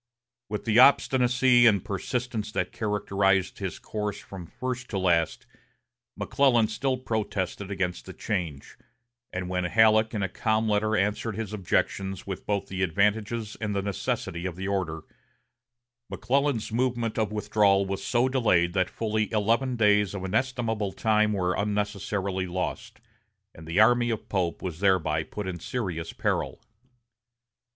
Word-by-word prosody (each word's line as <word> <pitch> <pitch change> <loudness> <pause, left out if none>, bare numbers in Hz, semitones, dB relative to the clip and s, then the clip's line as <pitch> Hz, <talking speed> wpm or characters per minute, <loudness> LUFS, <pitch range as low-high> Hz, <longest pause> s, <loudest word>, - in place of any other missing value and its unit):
With 105 0 -4
the 110 0 +4
obstinacy 125 -2 +5
and 100 -5 +3
persistence 110 +2 -3
that 90 - -1
characterized 100 -3 0
his 95 -2 -4
course 105 -1 -4
from 95 -5 -10
first 125 +3 -5
to 100 - -3
last, 85 -4 +1 0.7
McClellan 120 -6 +2
still 130 +4 -1
protested 100 -5 -3
against 95 -3 -3
the - - -7
change, 85 -9 -4 0.5
and 90 -1 -4
when 90 0 -1
Halleck 110 +3 +4
in 100 - -1
a - - +1
calm 110 +3 0
letter 110 +1 +1
answered 105 +2 -1
his 110 -1 -5
objections 95 -1 -1
with 95 -2 -6
both 100 -2 0
the 95 0 -5
advantages 105 +4 0
and 105 -2 -2
the 100 - -1
necessity 90 -2 -3
of 90 - -6
the 95 +2 -5
order, 90 -5 -2 1.1
McClellan's 130 0 0
movement 120 -2 -1
of 110 -2 0
withdrawal 100 -2 +2
was 95 0 -4
so 120 +4 +2
delayed 100 -10 +2
that 95 -1 +1
fully 110 -1 -2
eleven 115 +4 +1
days 105 -3 +3
of 95 - -5
inestimable 110 -1 -1
time 110 -1 +2
were 90 -3 0
unnecessarily 100 -2 -2
lost, 90 +1 -4 0.5
and 80 0 -12
the 85 +5 0
army 120 +2 +5
of 110 -2 -3
Pope 90 -4 -1
was 90 -4 -5
thereby 95 -4 +2
put 105 -2 -6
in 90 -2 -4
serious 90 -6 -4
peril. - - -2
105 Hz, 145 wpm, -27 LUFS, 95-115 Hz, 1.1 s, obstinacy